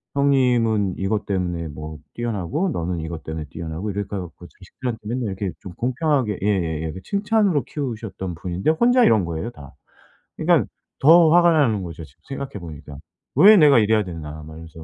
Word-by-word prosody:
"형님은 120 Hz, -8 st, +2 dB
이것 100 Hz, +1 st, -1 dB
때문에 90 Hz, -4 st, -2 dB
뭐 75 Hz, +1 st, -8 dB, 0.2 s
뛰어나고 120 Hz, -, -2 dB
너는 85 Hz, 0 st, -3 dB
이것 80 Hz, 0 st, -6 dB
때문에 80 Hz, -1 st, -5 dB
뛰어나고." 85 Hz, +5 st, -5 dB
이렇게 100 Hz, 0 st, -4 dB
해 -, -, -2 dB
갖고 90 Hz, -1 st, -10 dB
자식들한테 115 Hz, +6 st, -7 dB
맨날 120 Hz, +3 st, -2 dB
이렇게 95 Hz, -1 st, -3 dB
좀 95 Hz, -, -9 dB
공평하게 130 Hz, -, 0 dB
예예예 80 Hz, -6 st, -1 dB
칭찬으로 200 Hz, -6 st, +1 dB
키우셨던 110 Hz, -, -5 dB
분인데 90 Hz, -, -1 dB
혼자 245 Hz, +9 st, +4 dB
이런 110 Hz, -4 st, +4 dB
거예요, 85 Hz, +7 st, -4 dB
다. 70 Hz, -, -13 dB, 0.6 s
그러니까 -, -, +3 dB, 0.3 s
더 165 Hz, +3 st, +7 dB
화가 175 Hz, 0 st, +6 dB
나는 115 Hz, -10 st, +2 dB
거죠, 85 Hz, -2 st, -8 dB
지금 70 Hz, -2 st, -23 dB
생각해 135 Hz, -5 st, -6 dB
보니까. 75 Hz, -4 st, -10 dB, 0.4 s
'왜 210 Hz, +3 st, +8 dB
내가 145 Hz, -7 st, +6 dB
이래야 110 Hz, 0 st, +3 dB
되나.' 80 Hz, -4 st, -8 dB
막 80 Hz, +1 st, -11 dB
이러면서. 80 Hz, 0 st, -11 dB
100 Hz, 400 characters per minute, -22 LUFS, 85-130 Hz, 0.6 s, 왜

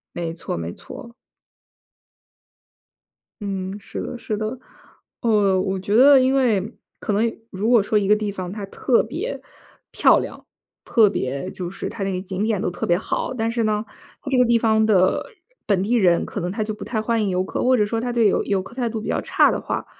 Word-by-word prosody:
没 170 Hz, -1 st, -3 dB
错 165 Hz, -, -5 dB
没 85 Hz, +1 st, -4 dB
错。 235 Hz, -1 st, -11 dB, 2.3 s
嗯， 195 Hz, -1 st, -4 dB
是 -, -, -6 dB
的 245 Hz, -, -6 dB
是 215 Hz, -2 st, -3 dB
的。 220 Hz, +4 st, -4 dB, 0.6 s
呃， 205 Hz, -4 st, +3 dB
我 190 Hz, 0 st, -1 dB
觉 200 Hz, +3 st, 0 dB
得 275 Hz, +3 st, +8 dB
因 260 Hz, +1 st, +2 dB
为 230 Hz, -5 st, +1 dB, 0.2 s
可 -, -, -5 dB
能 225 Hz, +3 st, 0 dB
如 205 Hz, +5 st, -1 dB
果 235 Hz, -4 st, +6 dB
说 210 Hz, +1 st, +1 dB
一 200 Hz, -, 0 dB
个 210 Hz, -, +5 dB
地 210 Hz, -1 st, -2 dB
方 185 Hz, -2 st, -6 dB
它 205 Hz, -1 st, -6 dB
特 235 Hz, +4 st, +1 dB
别 410 Hz, +11 st, -5 dB, 0.5 s
漂 -, -, +5 dB
亮， -, -, -6 dB, 0.4 s
特 225 Hz, -3 st, +4 dB
别 140 Hz, -2 st, -3 dB
就 180 Hz, -2 st, -6 dB
是 195 Hz, -, -5 dB
它 200 Hz, -, -5 dB
那 195 Hz, -, -1 dB
个 180 Hz, -, -2 dB
景 190 Hz, +1 st, -4 dB
点 215 Hz, -3 st, 0 dB
都 -, -, -1 dB
特 175 Hz, -, -4 dB
别 175 Hz, 0 st, +3 dB
好， 215 Hz, -, -3 dB
但 225 Hz, -3 st, -1 dB
是 230 Hz, -1 st, -1 dB
呢， 210 Hz, -1 st, +1 dB, 0.4 s
它 280 Hz, -, -6 dB
这 260 Hz, -, +2 dB
个 250 Hz, -, +5 dB
地 235 Hz, -1 st, +3 dB
方 220 Hz, -1 st, +3 dB
的 190 Hz, -4 st, +3 dB, 0.4 s
本 195 Hz, -3 st, +1 dB
地 220 Hz, +5 st, 0 dB
人 180 Hz, -7 st, +3 dB
可 -, -, -5 dB
能 175 Hz, +1 st, -3 dB
他 215 Hz, +2 st, -2 dB
就 215 Hz, 0 st, -3 dB
不 210 Hz, -, -8 dB
太 225 Hz, -3 st, -2 dB
欢 225 Hz, 0 st, 0 dB
迎 200 Hz, -, 0 dB
游 180 Hz, 0 st, +1 dB
客， 190 Hz, -, -3 dB
或 255 Hz, 0 st, +4 dB
者 210 Hz, -, +3 dB
说 225 Hz, +2 st, -2 dB
他 245 Hz, +1 st, -2 dB
对 230 Hz, -3 st, +4 dB
游 -, -, +1 dB
游 195 Hz, -2 st, 0 dB
客 230 Hz, -, -13 dB
态 245 Hz, -3 st, -1 dB
度 220 Hz, -1 st, -4 dB
比 220 Hz, -, -6 dB
较 -, -, 0 dB
差 -, -, +4 dB
的 -, -, -1 dB
话， -, -, -4 dB
210 Hz, 235 characters per minute, -22 LUFS, 190-230 Hz, 2.3 s, 得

